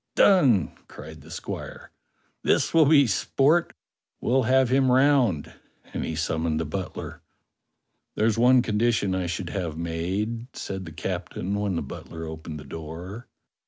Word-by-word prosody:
"Done!" 135 Hz, -, +5 dB, 0.2 s
cried 80 Hz, 0 st, -11 dB
the 80 Hz, -, -15 dB
squire. -, -, -7 dB, 0.5 s
"This -, -, +1 dB
will 160 Hz, -3 st, +6 dB
be 145 Hz, -2 st, +6 dB
sport; 140 Hz, -, +2 dB, 0.5 s
we'll 130 Hz, +2 st, +2 dB
have 130 Hz, -1 st, +4 dB
him 130 Hz, 0 st, +3 dB
round," 130 Hz, -, +3 dB, 0.4 s
and -, -, -2 dB
he 80 Hz, -, -3 dB
summoned 80 Hz, 0 st, -1 dB
the 80 Hz, -, -2 dB
butler. 95 Hz, +5 st, -6 dB, 0.9 s
"There's 110 Hz, 0 st, +2 dB
one 125 Hz, +1 st, +5 dB
condition 110 Hz, -3 st, +1 dB
I 95 Hz, -1 st, -1 dB
should 85 Hz, +1 st, -4 dB
have 85 Hz, -6 st, -3 dB
made," 95 Hz, +8 st, -3 dB
said 95 Hz, -1 st, -5 dB
the 80 Hz, -, -8 dB
captain 90 Hz, +2 st, -4 dB
when 100 Hz, -2 st, -1 dB
the -, -, -2 dB
butler 80 Hz, 0 st, -8 dB
opened 80 Hz, -1 st, -7 dB
the -, -, -9 dB
door. 80 Hz, -, -8 dB
95 Hz, 145 wpm, -25 LUFS, 80-125 Hz, 0.9 s, will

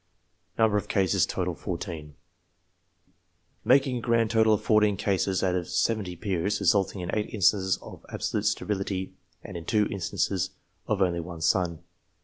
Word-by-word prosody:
14 95 Hz, -6 st, 0 dB, 1.5 s
Making 130 Hz, -1 st, +4 dB
a -, -, -4 dB
grand 115 Hz, -1 st, +2 dB
total 110 Hz, -1 st, +4 dB
of -, -, -6 dB
fourteen 105 Hz, -2 st, +3 dB
cases 95 Hz, -1 st, 0 dB
out 95 Hz, -1 st, +2 dB
of 90 Hz, -2 st, -2 dB
seventy 90 Hz, +1 st, 0 dB
peers, 100 Hz, +2 st, -1 dB
resulting 100 Hz, -1 st, +2 dB
in 90 Hz, -, -4 dB
eight 105 Hz, -1 st, -2 dB
instances 95 Hz, -2 st, +2 dB
of -, -, -11 dB
absolute -, -, -1 dB
sterility, 95 Hz, -2 st, -2 dB, 0.3 s
and -, -, -9 dB
in 85 Hz, -, -5 dB
two 105 Hz, +3 st, +2 dB
instances 95 Hz, -1 st, -1 dB, 0.3 s
of 100 Hz, -3 st, +2 dB
only 85 Hz, -2 st, 0 dB
one 85 Hz, 0 st, -7 dB
son. 85 Hz, -1 st, +1 dB
95 Hz, 130 wpm, -27 LUFS, 90-105 Hz, 1.5 s, Making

